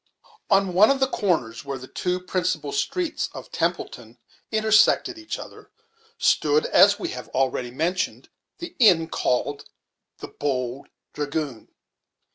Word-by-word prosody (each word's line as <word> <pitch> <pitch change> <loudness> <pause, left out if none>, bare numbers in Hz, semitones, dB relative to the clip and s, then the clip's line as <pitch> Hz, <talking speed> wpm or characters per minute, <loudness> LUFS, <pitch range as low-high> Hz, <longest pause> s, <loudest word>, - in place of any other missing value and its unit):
On 195 -3 +3
one 200 +5 +6
of 275 0 +2
the 265 - +4
corners, 170 - -1
where 140 -1 -5
the 130 0 -10
two 180 +5 -2
principal 180 -5 -2
streets 340 - -2
of - - -9
Templeton - - -3 0.3
intersected 220 - +3
each 325 - -5
other, - - -12 0.5
stood, 450 +2 +2
as - - +5
we 350 - -4
have 375 - -7
already 130 -1 0
mentioned, 165 +9 -2 0.3
the 345 0 -8
inn 180 -9 +5
called 140 +1 -1 0.5
the - - -9
"Bold 130 -2 -3 0.3
Dragoon". 145 -5 -4
180 Hz, 130 wpm, -24 LUFS, 140-220 Hz, 0.5 s, one